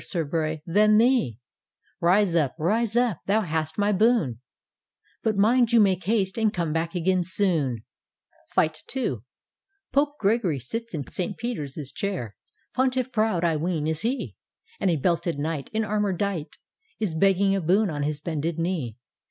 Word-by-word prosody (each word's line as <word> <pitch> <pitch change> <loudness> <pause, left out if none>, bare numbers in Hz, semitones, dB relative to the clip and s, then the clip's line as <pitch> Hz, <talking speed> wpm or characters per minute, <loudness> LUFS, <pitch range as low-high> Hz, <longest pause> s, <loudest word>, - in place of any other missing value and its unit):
Sir 170 -4 -2
Bray, 155 0 -2
than 210 +4 +4
theel 235 - +3 0.6
Rise 180 +1 +3
up, 150 -5 +1
rise 215 +7 0
up, 240 -9 +1
thou 210 +3 +3
hast 160 -4 -2
my 205 0 +2
boon; 200 - +2 0.8
But 215 -2 0
mind 235 +4 +4
you 235 - +6
make 190 -4 +3
haste, 200 -1 0
and 220 -1 +3
come 170 -6 -2
back 165 +2 -2
again 180 +1 +2
soon 165 - 0 0.7
I" 155 - +4 1.2
Pope 290 +1 +2
Gregory 200 -7 +1
sits 225 - -5
in 145 -3 -4
St. 185 +2 -3
Peter's 220 - -4 0.2
chair. 155 - -4 0.4
Pontiff 260 0 0
proud, 215 -6 +1
I 165 -2 +2
ween, 160 -1 -1
is 160 0 -1
he, 250 +5 -2 0.4
And 195 - +1
a 170 - +2
belted 170 +2 0
Knight, 150 -1 -3
In 220 0 0
armour 210 -2 0
dight, 185 -4 -3 0.4
Is 210 -7 -1
begging 195 +3 +3
a 195 - 0
boon 190 +4 +2
on 145 -1 -3
his 150 0 -1
bended 160 +1 -3
knee. 165 - -2
185 Hz, 160 wpm, -25 LUFS, 160-215 Hz, 1.2 s, you